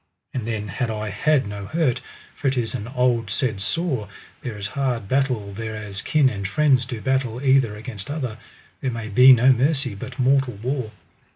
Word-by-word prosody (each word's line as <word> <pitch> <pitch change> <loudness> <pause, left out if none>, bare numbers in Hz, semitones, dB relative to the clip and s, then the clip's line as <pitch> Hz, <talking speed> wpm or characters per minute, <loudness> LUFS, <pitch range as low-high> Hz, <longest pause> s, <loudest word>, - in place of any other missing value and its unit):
And 120 -4 -3
then 105 -2 -2
had 115 +5 -2
I 110 -1 -3
had 150 0 +2
no 100 -1 -6
hurt, 135 -5 +1 0.3
for 140 - -2
it 135 0 +1
is 115 -2 -1
an 115 -4 -4
old 125 -3 +1
said 110 -3 -1
saw, 130 - -1 0.3
there 115 -4 -5
is 100 - -5
hard 120 -1 -2
battle 125 -5 0
thereas 105 -2 -5
kin 150 -3 +3
and 100 -6 -2
friends 135 0 +3
do 120 -3 -5
battle 130 -3 0
either 130 -5 +3
against 105 -1 -8
other, 130 -7 -4 0.4
there 130 - -1
may 115 -3 -5
be 125 +6 +8
no 130 +1 +7
mercy 135 -1 +1
but 125 +5 -8
mortal 130 -2 +2
war. 130 -3 -2
125 Hz, 185 wpm, -23 LUFS, 110-135 Hz, 0.4 s, be